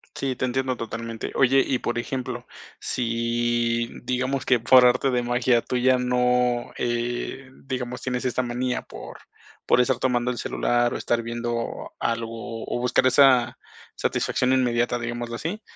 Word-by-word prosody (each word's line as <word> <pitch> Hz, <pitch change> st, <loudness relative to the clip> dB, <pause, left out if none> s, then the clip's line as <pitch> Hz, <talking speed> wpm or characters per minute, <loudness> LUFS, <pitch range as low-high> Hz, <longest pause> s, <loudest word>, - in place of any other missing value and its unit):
Sí, 135 Hz, -2 st, -2 dB
te 130 Hz, -, -1 dB
entiendo 130 Hz, 0 st, -1 dB
totalmente. 115 Hz, 0 st, -5 dB
Oye, 135 Hz, +1 st, +4 dB
y 130 Hz, -, 0 dB
por 120 Hz, -, -2 dB
ejemplo, 125 Hz, 0 st, -4 dB, 0.3 s
si, 120 Hz, 0 st, 0 dB
mm, -, -, -13 dB
digamos 130 Hz, +1 st, -1 dB
que 125 Hz, -3 st, +3 dB
por 125 Hz, +2 st, +6 dB
arte 125 Hz, +2 st, +3 dB
de 125 Hz, -1 st, 0 dB
magia 120 Hz, 0 st, +2 dB
tuya 130 Hz, +1 st, +2 dB
no, 125 Hz, -1 st, +1 dB
eh, 120 Hz, +2 st, -3 dB, 0.2 s
digamos 125 Hz, -2 st, -4 dB
tienes 125 Hz, 0 st, -2 dB
esta 130 Hz, 0 st, 0 dB
manía 125 Hz, +1 st, -2 dB
por -, -, -10 dB, 0.5 s
por -, -, +4 dB
estar 125 Hz, 0 st, +2 dB
tomando 125 Hz, -1 st, 0 dB
el 125 Hz, -, -3 dB
celular, 120 Hz, 0 st, 0 dB
o -, -, -2 dB
estar 120 Hz, 0 st, 0 dB
viendo 120 Hz, 0 st, -4 dB
algo, 115 Hz, 0 st, -4 dB
o -, -, -3 dB
buscar 125 Hz, +1 st, +3 dB
esa 130 Hz, -2 st, +5 dB, 0.4 s
satisfacción 130 Hz, 0 st, 0 dB
inmediata, 120 Hz, -1 st, +1 dB
digámoslo 120 Hz, 0 st, -4 dB
así, 170 Hz, -, -4 dB
120 Hz, 150 wpm, -24 LUFS, 120-130 Hz, 0.5 s, por